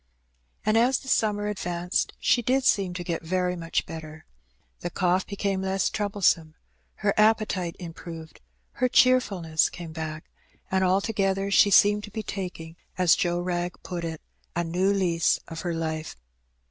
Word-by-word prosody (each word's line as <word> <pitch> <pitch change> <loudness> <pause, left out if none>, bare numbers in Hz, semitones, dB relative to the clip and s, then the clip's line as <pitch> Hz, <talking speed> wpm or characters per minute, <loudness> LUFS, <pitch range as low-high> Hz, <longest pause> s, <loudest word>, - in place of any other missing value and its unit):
And 215 +1 +3
as 255 +3 +3
the 265 - -12
summer 210 -4 +1
advanced 180 -3 -2
she 245 - +3
did 260 +3 +1
seem 195 -8 +2
to 180 - -4
get 170 -2 -3
very 180 +2 -1
much 165 -1 -2
better. 155 -1 -9 0.5
The 175 - -4
cough 180 +1 +1
became 200 -1 -2
less 190 0 0
troublesome, 195 -6 +1 0.5
her 200 - +4
appetite 215 -5 +2
improved, 165 -2 -9 0.3
her 255 0 0
cheerfulness 200 -12 +3
came 170 -2 -8
back, 155 -1 -5 0.5
and 190 0 +2
alto 195 +4 +1
gether 195 -1 0
she 200 - +6
seemed 205 +1 +5
to - - -12
be 215 +1 -5
taking, 175 -5 -6 0.2
as 180 -2 +5
Joe 175 -1 0
Wrag 175 0 -2
put 175 -2 -5
it, 160 -2 -5 0.3
^^a 170 0 -1
new 185 +4 +1
lease 175 -4 +2
of 165 -1 -6
her 175 -2 -2
life." 160 -1 -3
180 Hz, 160 wpm, -26 LUFS, 165-205 Hz, 0.5 s, she